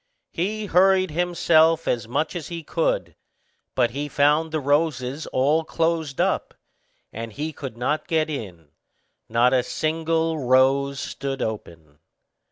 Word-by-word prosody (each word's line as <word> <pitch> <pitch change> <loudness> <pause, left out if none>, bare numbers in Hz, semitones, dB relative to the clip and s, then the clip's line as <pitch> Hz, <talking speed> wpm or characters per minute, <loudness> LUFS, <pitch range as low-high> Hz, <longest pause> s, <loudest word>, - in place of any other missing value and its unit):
He 210 +5 -2
hurried 185 -1 +3
himself 165 -1 +3
as 115 -2 -1
much 150 +9 -1
as 170 -4 -5
he 170 -1 -6
could; - - -1 0.6
but 120 -2 +2
he 145 +3 -4
found 150 +3 +2
the 155 - -1
roses 145 -1 0
all 145 +5 +2
closed 160 -3 -1
up, - - 0 0.6
and 115 +1 -6
he 150 +7 -4
could 130 -5 -8
not 140 +6 -1
get 160 -3 +1
in; 95 - -7 0.6
not 120 +3 +3
a 130 - +4
single 160 +3 -1
rose 135 +1 +3
stood 135 -1 -4
open. 80 -9 -7
150 Hz, 135 wpm, -23 LUFS, 130-165 Hz, 0.6 s, a